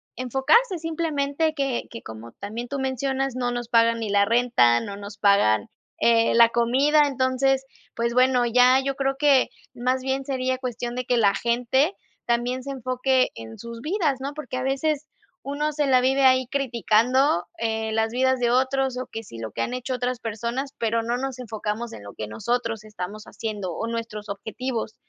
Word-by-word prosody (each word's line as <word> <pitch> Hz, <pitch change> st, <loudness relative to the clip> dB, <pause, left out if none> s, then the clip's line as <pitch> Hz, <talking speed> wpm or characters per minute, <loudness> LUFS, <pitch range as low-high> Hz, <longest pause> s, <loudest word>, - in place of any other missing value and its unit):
enfocarse. 270 Hz, -, +2 dB
Simplemente, 315 Hz, -1 st, -1 dB
que 275 Hz, -4 st, -1 dB
que 230 Hz, -, -8 dB
como 110 Hz, +1 st, -9 dB
también 225 Hz, +4 st, -5 dB
tú 280 Hz, +1 st, -4 dB
mencionas, 265 Hz, 0 st, -1 dB
no 245 Hz, -1 st, -1 dB
nos 240 Hz, -1 st, -4 dB
pagan 230 Hz, 0 st, +4 dB
ni 220 Hz, -2 st, -3 dB
la 200 Hz, 0 st, +4 dB
renta, 230 Hz, -, +4 dB
no 200 Hz, +10 st, -6 dB
nos 205 Hz, 0 st, -9 dB
pagan, 155 Hz, -, +3 dB, 0.3 s
eh, 230 Hz, -1 st, +4 dB
la 230 Hz, 0 st, +7 dB
comida. 265 Hz, +6 st, +3 dB
Entonces, 265 Hz, 0 st, +1 dB, 0.3 s
pues, 235 Hz, 0 st, -1 dB
bueno, 255 Hz, -1 st, +4 dB
ya 250 Hz, +2 st, +5 dB
yo 275 Hz, 0 st, -2 dB
creo 270 Hz, 0 st, 0 dB
que 285 Hz, -3 st, +4 dB, 0.3 s
más 255 Hz, +2 st, 0 dB
bien 270 Hz, 0 st, -1 dB
sería 260 Hz, -1 st, -1 dB
cuestión 245 Hz, -1 st, -4 dB
de 250 Hz, -1 st, -3 dB
que 245 Hz, -1 st, +1 dB
la 200 Hz, -3 st, +4 dB
gente 250 Hz, +8 st, +1 dB, 0.3 s
también 245 Hz, +2 st, 0 dB
se 275 Hz, -, -5 dB
enfoque 255 Hz, 0 st, +1 dB
en 110 Hz, 0 st, -9 dB
sus 235 Hz, 0 st, -8 dB
vidas, 310 Hz, -5 st, 0 dB
¿no? 280 Hz, +2 st, -4 dB
Porque 265 Hz, -4 st, -6 dB
a 255 Hz, -, -2 dB
veces, 285 Hz, +3 st, 0 dB, 0.4 s
uno 295 Hz, +2 st, -2 dB
se 295 Hz, 0 st, 0 dB
la 255 Hz, -1 st, +5 dB
vive 270 Hz, +2 st, +2 dB
ahí, 255 Hz, -1 st, +4 dB
criticando, 250 Hz, -, +2 dB
eh, 220 Hz, -1 st, -1 dB
las 220 Hz, 0 st, 0 dB
vidas 260 Hz, +1 st, +2 dB
de 240 Hz, -1 st, +2 dB
otros. 260 Hz, 0 st, +1 dB
O 255 Hz, -, -3 dB
que 225 Hz, -, -5 dB
si 115 Hz, -, -11 dB
lo 110 Hz, -1 st, -5 dB
que 115 Hz, -, -4 dB
han 245 Hz, -, -2 dB
hecho 255 Hz, +1 st, -4 dB
otras 250 Hz, 0 st, -2 dB
personas, 235 Hz, +5 st, -3 dB
pero 230 Hz, 0 st, 0 dB
no 240 Hz, +1 st, -1 dB
nos 265 Hz, -1 st, -4 dB
enfocamos 225 Hz, 0 st, -4 dB
en -, -, -9 dB
lo 100 Hz, -, -10 dB
que 110 Hz, -, -5 dB
nosotros 225 Hz, -, -2 dB
estamos 210 Hz, 0 st, -7 dB
haciendo 205 Hz, -6 st, -5 dB
o 225 Hz, -, -3 dB
nuestros 225 Hz, -2 st, -5 dB
objetivos. 220 Hz, +3 st, -4 dB
245 Hz, 185 wpm, -24 LUFS, 225-265 Hz, 0.4 s, la